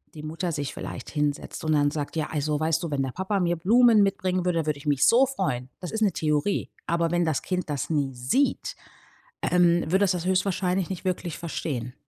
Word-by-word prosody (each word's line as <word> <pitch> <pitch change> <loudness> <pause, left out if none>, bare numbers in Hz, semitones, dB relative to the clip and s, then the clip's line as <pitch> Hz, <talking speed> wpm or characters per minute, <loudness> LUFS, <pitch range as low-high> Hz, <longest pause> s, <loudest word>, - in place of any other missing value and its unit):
die 150 - -8
Mutter 165 +3 -3
sich 145 -3 -3
vielleicht - - -7
hinsetzt 150 -2 -2
und 155 - +2
dann 145 -1 +3
sagt: 145 0 -4
„Ja 155 - 0
also 150 -1 -1
weißt 160 +2 +1
du, 170 - -2
wenn 140 -2 0
der 130 - -3
Papa 190 +4 -1
mir 175 -1 +1
Blumen 225 +5 +5
mitbringen 185 -2 0
würde, 170 -3 +1
würde 150 -2 -1
ich 145 - -14
mich 140 -2 +3
so 250 +4 +6
freuen." 180 - -2
Das 180 - -5
ist 220 - -3
'ne 205 -5 +3
Theorie. 150 +5 0 0.2
Aber 170 0 +1
wenn 175 0 +2
das 155 -4 0
Kind 180 -3 -2
das 145 -3 -2
nie 145 -4 0
sieht, 130 - 0 0.7
ähm, 175 -1 +3
wird 190 +2 +3
dass 195 -2 +4
das 175 -1 -3
höchstwahrscheinlich 185 -1 0
nicht 190 0 -6
wirklich 175 -3 -2
verstehen. 130 -7 -4
170 Hz, 215 wpm, -26 LUFS, 150-185 Hz, 0.7 s, so